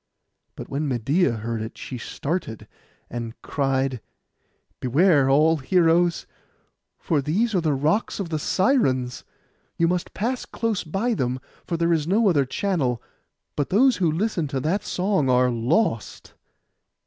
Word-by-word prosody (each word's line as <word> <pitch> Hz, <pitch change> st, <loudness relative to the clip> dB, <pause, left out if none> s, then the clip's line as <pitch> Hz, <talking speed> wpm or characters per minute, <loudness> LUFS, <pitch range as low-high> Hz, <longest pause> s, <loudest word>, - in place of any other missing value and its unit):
But -, -, -8 dB
when 145 Hz, +2 st, -2 dB
Medeia 135 Hz, +6 st, +1 dB
heard 115 Hz, 0 st, -4 dB
it, 110 Hz, +1 st, -7 dB
she 125 Hz, -, -7 dB
started, 140 Hz, -, -4 dB, 0.4 s
and 115 Hz, -1 st, -6 dB
cried, 135 Hz, -3 st, -1 dB, 0.8 s
'Beware, 140 Hz, +1 st, +3 dB
all 155 Hz, +4 st, +4 dB
heroes, 170 Hz, +3 st, +2 dB, 0.7 s
for 155 Hz, -4 st, 0 dB
these 200 Hz, -, 0 dB
are 185 Hz, -, +2 dB
the 155 Hz, -3 st, +1 dB
rocks 155 Hz, +14 st, 0 dB
of 190 Hz, -4 st, -3 dB
the 155 Hz, -2 st, -2 dB
Sirens. 135 Hz, -, +1 dB, 0.5 s
You 165 Hz, -, +3 dB
must 180 Hz, 0 st, -2 dB
pass 245 Hz, +5 st, -1 dB
close 225 Hz, -4 st, -2 dB
by 195 Hz, +9 st, -1 dB
them, 130 Hz, -, -1 dB, 0.3 s
for 170 Hz, -, -1 dB
there 170 Hz, 0 st, +2 dB
is 155 Hz, -2 st, 0 dB
no 205 Hz, +3 st, +3 dB
other 145 Hz, -6 st, +2 dB
channel; 135 Hz, -, -1 dB, 0.6 s
but 145 Hz, -, -1 dB
those 250 Hz, +6 st, +4 dB
who 175 Hz, -5 st, +2 dB
listen 175 Hz, -2 st, -1 dB
to 135 Hz, -1 st, -2 dB
that 180 Hz, +9 st, 0 dB
song 185 Hz, -9 st, 0 dB
are 125 Hz, 0 st, +3 dB
lost. 120 Hz, -, -1 dB
155 Hz, 145 wpm, -24 LUFS, 130-185 Hz, 0.8 s, all